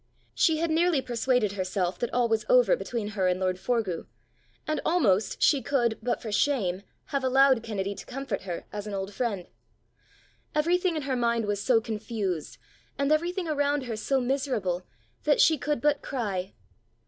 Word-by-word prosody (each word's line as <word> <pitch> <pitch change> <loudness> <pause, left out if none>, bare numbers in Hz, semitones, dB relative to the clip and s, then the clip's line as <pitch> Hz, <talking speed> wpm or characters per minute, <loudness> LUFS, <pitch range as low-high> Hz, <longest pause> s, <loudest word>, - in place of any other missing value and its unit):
She 320 -4 +3
had 330 0 0
nearly 335 -1 +3
persuaded 245 -3 +1
herself 185 -2 -2
that 240 - -2
all 245 -1 +2
was 225 -1 +1
over - - +6
between 235 - -4
her 195 -4 0
and 180 0 +1
lord 185 -1 0
Forgue, 215 -7 -1 0.6
and 310 -1 -1
almost 225 - +2
she 280 -3 +4
could, 240 -3 0
but 240 +2 -2
for 220 - -4
shame, 205 -6 +1 0.3
have 275 -1 0
allowed 265 -1 +4
Kennedy 200 -3 -3
to 195 - -10
comfort 265 -5 -4
her 180 -3 -5
as 210 0 -5
an 205 - -4
old 195 +1 -4
friend. 205 -6 -2 1.1
Everything 345 +3 +2
in 305 - -2
her 265 -1 -1
mind 235 -2 +1
was 205 -1 -1
so 245 -1 +4
confused, 210 -6 -4 0.4
and 280 +1 +1
everything 345 +3 +1
around 290 -2 +1
her 235 -3 -4
so 265 +5 0
miserable, 245 -9 -1 0.4
that 295 -1 +3
she 315 -3 +5
could 295 -2 -1
but 290 +2 +2
cry. 200 -8 -3
240 Hz, 170 wpm, -27 LUFS, 200-285 Hz, 1.1 s, over